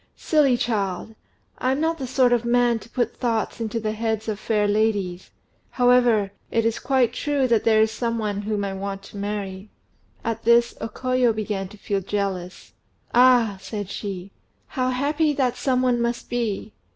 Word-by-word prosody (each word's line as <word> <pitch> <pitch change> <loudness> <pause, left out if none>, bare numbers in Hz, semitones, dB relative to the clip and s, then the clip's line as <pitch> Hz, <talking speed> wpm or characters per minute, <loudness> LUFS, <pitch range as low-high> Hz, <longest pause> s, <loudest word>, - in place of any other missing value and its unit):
"Silly 285 -6 +3
child! 210 -2 -2 0.5
I'm 260 +2 +1
not 325 +1 0
the 260 - -4
sort 250 -1 +3
of 240 -1 +2
man 240 -1 +2
to 220 - -15
put 240 -1 -1
thoughts 230 -1 -1
into 225 0 -2
the 215 -1 -2
heads 220 0 -2
of 210 -2 -2
fair 210 -1 +1
ladies. 205 -4 0 0.4
However, 245 -5 +3 0.2
it 230 -1 +1
is 230 0 0
quite 255 -2 +2
true 285 -3 0
that 230 -3 +2
there 220 -1 +5
is 220 - 0
some 230 0 -2
one 205 -2 -2
whom 205 -1 -2
I 195 - -3
want 195 0 -5
to 200 - -11
marry." 200 -1 -4 0.5
At 225 -1 -3
this 235 +1 +4
O 225 - -3
Koyo 255 -1 +1
began 205 -3 -3
to 210 - -14
feel 200 -1 -2
jealous. 190 -2 -4 0.4
"Ah!" 240 -5 +5
said 200 0 -5
she, 195 -2 -5 0.4
"how 255 -2 -1
happy 295 +4 +1
that 260 -4 0
some 255 -2 +1
one 245 -2 +2
must 235 0 -2
be! 220 -3 -2
225 Hz, 175 wpm, -23 LUFS, 205-245 Hz, 0.5 s, there